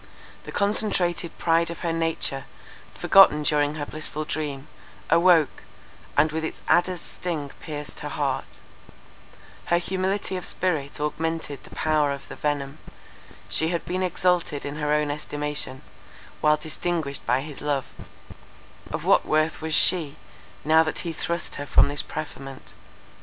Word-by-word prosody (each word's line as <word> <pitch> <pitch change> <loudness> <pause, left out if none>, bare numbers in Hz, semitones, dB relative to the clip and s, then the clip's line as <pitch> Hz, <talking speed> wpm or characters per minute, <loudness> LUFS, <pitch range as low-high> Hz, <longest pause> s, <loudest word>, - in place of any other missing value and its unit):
The - - -7
concentrated 195 -4 +1
pride 165 0 +2
of 170 - -7
her 170 -2 -1
nature, 165 -4 -1 0.5
forgotten 170 -6 +6
during 150 0 +2
her 150 -2 -3
blissful 155 0 -4
dream, 145 -2 -4 0.4
awoke, 170 -2 +4 0.6
and 155 +2 +4
with 160 +1 -2
its 160 - -4
adder's 175 0 +3
sting 155 -6 -4
pierced 150 -1 -7
her - - -5
heart; - - -2 1.1
her 170 - +3
humility 190 +2 -1
of 180 - -5
spirit 155 -7 0
augmented 150 -1 -2
the - - -13
power 155 -2 +2
of 140 -1 -6
the - - -7
venom; 145 -1 -2 0.7
she 160 - +3
had 170 0 -2
been 185 +1 -2
exalted 180 -4 +1
in 145 +1 -5
her 150 -1 -1
own 150 -1 +2
estimation, 145 -2 -3 0.6
while 150 0 +4
distinguished 155 -2 -2
by 125 +3 +3
his 150 0 -8
love: 145 -2 0 1.0
of - - -4
what - - +5
worth 155 +1 +1
was 160 -1 0
she, 160 -6 +3 0.5
now 160 +1 +6
that 160 -1 -1
he 165 - -2
thrust 170 +2 -3
her 145 - -4
from 140 - +5
this 145 0 +2
preferment? 135 -3 -7
155 Hz, 145 wpm, -25 LUFS, 145-170 Hz, 1.1 s, forgotten